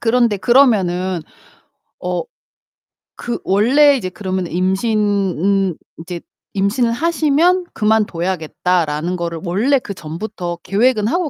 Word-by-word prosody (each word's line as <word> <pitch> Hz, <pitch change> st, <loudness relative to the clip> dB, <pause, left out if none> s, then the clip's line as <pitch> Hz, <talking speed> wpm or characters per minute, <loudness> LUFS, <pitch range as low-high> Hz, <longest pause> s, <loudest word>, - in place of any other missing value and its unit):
그런데 235 Hz, -2 st, +2 dB
그러면은 190 Hz, -6 st, +2 dB, 0.8 s
어 -, -, -1 dB, 1.0 s
그 240 Hz, -1 st, -3 dB
원래 270 Hz, +9 st, +4 dB
이제 190 Hz, -, -4 dB
그러면 185 Hz, -1 st, -3 dB
임신은 195 Hz, -1 st, 0 dB, 0.2 s
이제 170 Hz, +1 st, -7 dB, 0.3 s
임신을 230 Hz, +5 st, +1 dB
하시면 335 Hz, +4 st, +2 dB
'그만둬야겠다.'라는 180 Hz, -5 st, 0 dB
거를 170 Hz, -2 st, -4 dB
원래 215 Hz, +11 st, +2 dB
그 200 Hz, -, -7 dB
전부터 175 Hz, +1 st, -6 dB
계획은 210 Hz, +2 st, +2 dB
하고 340 Hz, +5 st, 0 dB
200 Hz, 255 characters per minute, -18 LUFS, 180-240 Hz, 1.0 s, 원래